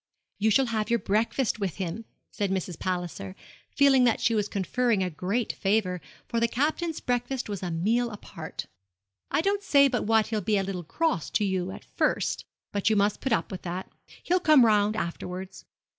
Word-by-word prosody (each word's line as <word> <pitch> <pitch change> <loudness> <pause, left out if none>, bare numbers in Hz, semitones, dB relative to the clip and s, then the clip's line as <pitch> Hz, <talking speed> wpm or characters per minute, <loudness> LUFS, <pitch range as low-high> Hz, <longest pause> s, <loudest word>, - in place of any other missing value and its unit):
'You 215 +2 +3
shall 265 +5 +4
have 220 -3 -1
your 235 - +3
breakfast 225 +3 0
with 195 -5 -2
him,' 190 +4 -4 0.3
said 200 -1 -1
Mrs. 185 -3 -3
Palliser, 175 - -3 0.3
feeling 275 -2 +5
that 240 -2 +3
she 230 - +2
was 210 -2 +1
conferring 210 +2 0
a 180 - -2
great 195 +9 -1
favour, 195 -3 0 0.3
for 235 - -1
the 235 - +3
Captain's 315 +6 -1
breakfast 245 +1 -2
was 205 -3 -4
a 180 - -3
meal 220 +9 +1
apart. 210 -2 -7 0.6
'I - - +2
don't 400 +3 0
say 280 -7 +5
but 250 -2 -1
what 220 0 +4
he'll 220 -2 -1
be 210 +2 +1
a 195 - +1
little 190 -2 -4
cross 250 - -1
to 210 - +1
you 190 -2 -1
at - - -9
first; - - 0 0.3
but 205 +1 +1
you 220 - +3
must 205 0 +2
put 265 - -2
up 225 - +1
with 185 - -5
that. 180 +1 -5 0.3
He'll 360 +1 +2
come 305 -8 +6
round 210 -1 +3
afterwards.' 185 0 -5
210 Hz, 190 wpm, -27 LUFS, 185-245 Hz, 0.6 s, come